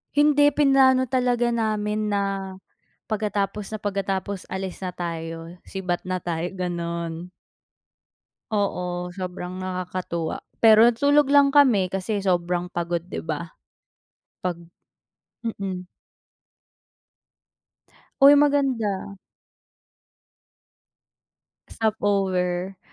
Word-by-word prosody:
Hindi, 290 0 +5
plinano 270 -2 +5
talaga 245 -2 +1
namin 215 -2 -1
na 200 0 +1 0.8
pagkatapos 210 -1 -2
na 215 - -4
pagkatapos, 195 -1 -3
alis 190 0 -5
na 180 - -2
tayo, 165 -1 -4 0.2
sibat 180 -2 -3
na 185 0 -2
tayo, 170 0 -3
gano'n. 170 -1 -4 1.2
Oo, 180 -3 -2
sobrang 185 0 -6
nakakatuwa, 180 -3 -3 0.2
pero 220 +1 +8
natulog 285 +4 +3
lang 280 -1 +5
kami, 240 -11 +4
kasi 195 +1 -2
sobrang 180 -1 0
pagod, 170 -1 -2
'di 180 - -6
ba, 160 +1 -5 0.9
pag 180 -2 -2 0.9
mm. 190 -4 -4 2.3
Uy 285 +1 +9
maganda. 255 -9 +1 2.5
Stopover, 190 -4 -1
195 Hz, 85 wpm, -24 LUFS, 180-225 Hz, 2.5 s, Uy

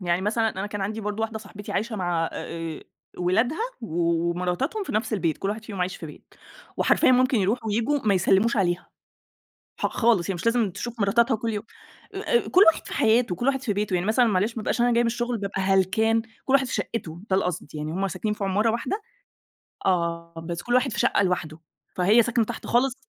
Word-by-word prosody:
يعني 175 0 0
مثلًا 225 +2 +1
أنا 190 +1 -4
كان 205 -1 -5
عندي 215 +3 -3
برضه 210 +1 -3
واحدة 220 0 -2
صاحبتي 205 -1 -9
عايشة 220 +2 -2
مع 175 -3 -1
آآ 165 -1 -5 0.4
ولادها 225 - +1 0.2
و 230 - -6
و 170 0 +1
ومراتتهُم 180 - -2
في - - -5
نَفْس 215 +2 -1
البيت 170 -7 0
كل 195 - -2
واحد 215 +2 -4
فيهم 200 -5 -6
عايش 185 +2 -1
في 165 - -8
بيت. 150 - -14 0.4
وحرفيًا 255 - +4
ممكن 255 -1 +3
يروحوا 220 +4 0
وييجوا 230 +7 +1
ما 205 -2 +3
يسلِّموش 195 +5 +3
عليها، 175 -3 0 0.9
ح - - +2
خالص 225 -7 +2
هي - - -1
مش 175 +5 -6
لازم 230 -3 +2
تشوف 235 +5 -6
مراتتها 230 +4 +3
كُلّ 225 +1 -3
يو 210 - -3 0.5
آآ 475 - 0
كل 370 - +6
واحد - - -10
في - - -6
حياته، 225 -3 +3
كل 240 - -3
واحد 270 -1 +1
في 235 -6 0
بيته. 205 -1 -1
يعني 175 +1 0
مثلًا 235 +3 +4
معلش 210 +3 +1
ما 225 - -3
أبقاش 235 - -1
أنا 240 0 +4
جايّة 235 - +3
من 230 - +2
الشُغل 240 0 -2
بابقى 195 -1 -3
هلكان، 195 +4 +2 0.2
كل 265 - 0
واحد 275 -1 +4
في - - -4
شَقِّته 170 -7 -4
ده 190 - +4
القصد، 180 -5 -2
يعني 150 +1 -4
هم 195 +3 -1
ساكنين 210 +4 -2
في 205 - -4
عمارة 205 +4 +2
واحدة 255 - -2 0.8
آه. 170 -2 0
بس 170 0 -4
كل 240 - -1
واحد 255 0 +3
في - - -2
شَقّة - - +3
لوحده، 175 -4 -1 0.4
فهي 205 +6 +5
ساكنة 235 0 +1
تحت 235 +2 -7
خالص 250 +2 +2
210 Hz, 215 wpm, -25 LUFS, 180-235 Hz, 0.9 s, كل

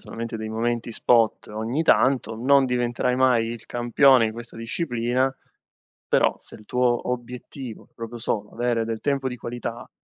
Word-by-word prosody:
solamente 115 0 -6
dei 110 0 -5
momenti 115 +1 -2
spot 115 -1 +2
ogni 110 +8 -2
tanto, 130 -7 +3
non 135 +3 +4
diventerai 125 0 0
mai 125 -3 +3
il 115 -1 -7
campione 120 +1 +4
di 110 - -3
questa 120 0 -9
disciplina, 125 +1 -1 0.7
però - - +3
se - - -14
il 105 - -16
tuo 125 -1 +1
obiettivo 125 0 -6
è - - -39
proprio 115 +1 -7
solo 105 -2 -2
avere 120 -1 0
del 115 -1 -4
tempo 140 -2 0
di 125 - -6
qualità, 120 -1 -6
120 Hz, 160 wpm, -24 LUFS, 115-125 Hz, 0.7 s, non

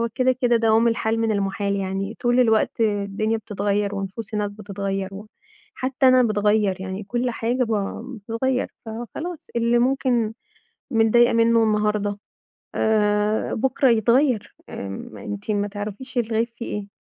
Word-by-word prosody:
هو 235 - +1
كده 255 0 +3
كده 245 -2 +2
دوام 225 +1 +4
الحال 225 0 0
من 225 -1 +1
المُحال 200 0 -1
يعني، 195 +2 -3
طول 245 +1 +3
الوقت 225 -1 +2
الدنيا 210 +1 0
بتتغير، 205 -1 -1
ونفوس 200 +3 -5
الناس 210 -1 -1
بتتغير، 195 -2 -4
وحتى 255 +5 -3
أنا 255 0 +6
باتغير 210 -2 +2
يعني، 190 +2 -5
كل 240 +4 -1
حاجة 240 +2 0
ب 225 - -3 0.4
بتتغير، 230 +5 -1 0.2
فخلاص 295 +9 -6
اللي 235 +1 +3
ممكن 245 -3 +1 0.6
متضايقة 235 0 +4
منه 230 0 +4
النهاردة 210 -1 +1 0.6
آآ، 210 0 +1
بكرة 265 +2 +2
يتغير، 235 +1 +2
آمم، 100 +2 -7
أنتِ 100 - -5
ما 205 -1 0
تعرفيش 205 +6 -7
الغيب 230 0 +1
فيه 235 0 -9
إيه، 200 - -9
220 Hz, 140 wpm, -23 LUFS, 205-235 Hz, 0.6 s, أنا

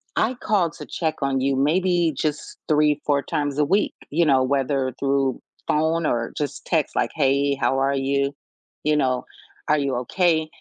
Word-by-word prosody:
I 245 +3 +1
called 195 -9 0
to - - -9
check 160 -2 -2
on 135 -1 0
you 135 0 +1
maybe 170 +3 +2
just 150 +1 -3
3, 150 -1 +3
4 140 -1 +1
times 145 -1 -2
a 150 - +3
week, 195 +7 +1 0.2
you 165 +2 +2
know, 135 -3 +4
whether 135 -1 0
through 135 -2 0 0.3
phone 160 +2 +1
or 115 -3 -1
just 145 -2 -4
text 160 -5 0
like, - - 0
"Hey, 140 -1 +2
how 135 0 0
are 140 +1 +1
you?" 140 +1 0 0.5
You 150 0 +2
know, 130 -3 0 0.4
"Are 150 0 +3
you 135 -3 -1
okay?" 160 +1 +1
145 Hz, 175 wpm, -23 LUFS, 135-160 Hz, 0.5 s, know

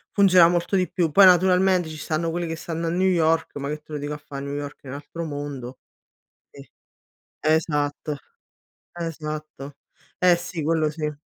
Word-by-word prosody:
Funziona 185 -4 +7
molto 175 +3 0
di 185 -1 +1
più. 170 -4 0
Poi 195 +6 +7
naturalmente 185 0 +4
ci 155 - -8
stanno 160 +2 -2
quelli 170 +1 -2
che 165 - -3
stanno 165 0 -4
a - - 0
New 180 +3 +1
York, 165 -3 +1
ma 140 0 -4
che 150 - -3
te 155 - -13
lo - - -2
dico 145 +1 -4
a - - -5
fare, 140 -2 -8
New 140 0 -4
York 145 0 -6
è - - -14
un 130 - -6
altro 150 +4 -7
mondo. 145 -4 -6 0.7
E - - -14 0.7
esatto, 150 -1 0 0.7
esatto. 155 -4 -6 0.4
Eh 180 -1 +5
sì, 170 -1 -5
quello 160 0 +1
sì. 150 0 -3
160 Hz, 180 wpm, -24 LUFS, 145-175 Hz, 0.7 s, Funziona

